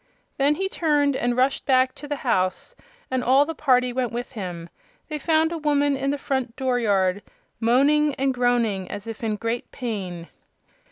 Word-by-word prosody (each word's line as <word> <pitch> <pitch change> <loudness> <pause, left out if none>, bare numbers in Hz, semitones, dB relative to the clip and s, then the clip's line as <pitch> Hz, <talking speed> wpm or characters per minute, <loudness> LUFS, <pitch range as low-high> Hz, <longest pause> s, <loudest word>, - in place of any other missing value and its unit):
Then 285 +2 +3
he 385 +4 -1
turned 295 -6 +1
and 245 -1 0
rushed 265 +2 +1
back 255 -1 +3
to 295 - -10
the 290 - -2
house, 185 - 0 0.4
and 260 -1 0
all 270 +3 +5
the 325 - -4
party 250 -5 +2
went 250 -2 -1
with 240 +2 -5
him. 180 -7 -6 0.4
They 305 -1 -3
found 320 +2 +2
a 335 - -3
woman 290 -2 +2
in 275 +1 -1
the 285 - 0
front 265 -4 -2
dooryard 205 -7 +1 0.4
moaning 280 +5 +3
and 270 0 0
groaning 235 -6 0
as 205 - -6
if 225 0 -7
in 220 -2 0
great 230 +2 -3
pain. 190 -8 -5
255 Hz, 175 wpm, -24 LUFS, 230-285 Hz, 0.4 s, all